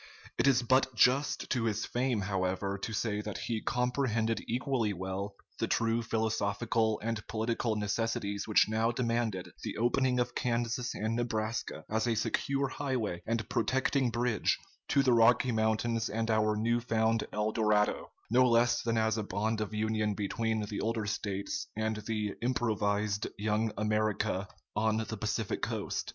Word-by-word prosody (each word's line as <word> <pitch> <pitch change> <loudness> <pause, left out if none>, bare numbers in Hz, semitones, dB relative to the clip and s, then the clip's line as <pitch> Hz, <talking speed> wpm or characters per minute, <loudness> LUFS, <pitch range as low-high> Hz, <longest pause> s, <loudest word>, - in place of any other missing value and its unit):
It - - +4
is 130 -3 +4
but 130 +1 +3
just 130 +5 +3
to 120 -3 +1
his 110 -1 0
fame, 125 -3 0
however, 95 0 -1
to 100 +3 -5
say 105 0 -1
that 105 -1 -5
he 115 -2 -2
comprehended 125 -2 0
equally 120 -3 0
well 95 +2 -4 0.2
the - - 0
true 115 0 +1
philosophical 110 0 0
and 115 -1 -1
political 115 0 -1
necessities 105 -1 -1
which 105 - +5
now 110 +1 +1
demanded 115 -5 -1
the - - -4
opening 125 +2 +2
of 120 - 0
Kansas 120 0 -1
and 110 +2 -1
Nebraska 110 -8 -2
as 110 +2 0
a 115 - +2
secure 140 +5 0
highway 130 -10 -2
and 115 -2 -1
protecting 130 +2 +1
bridge 120 -1 +1 0.3
to 140 - +3
the 130 -2 +4
Rocky 120 +2 +5
Mountains 110 +1 +1
and 115 +1 -1
our 110 -1 +2
new 115 +2 +1
found 115 -1 +1
El 105 +1 0
Dorado, 105 -2 +1 0.2
no 125 +2 +6
less 120 0 +3
than 115 -1 0
as 110 0 +2
a - - -1
bond 110 +2 -1
of 110 - -3
union 110 -1 0
between 110 +1 -1
the 100 - -4
older 110 -1 -1
States 100 - -3
and 110 0 -1
the 105 -3 -1
improvised 105 -4 0
"Young 110 +1 0
America" 105 -2 0 0.3
on 110 0 +2
the 110 0 -3
Pacific 110 0 -2
coast. - - -2
110 Hz, 155 wpm, -31 LUFS, 105-120 Hz, 0.3 s, no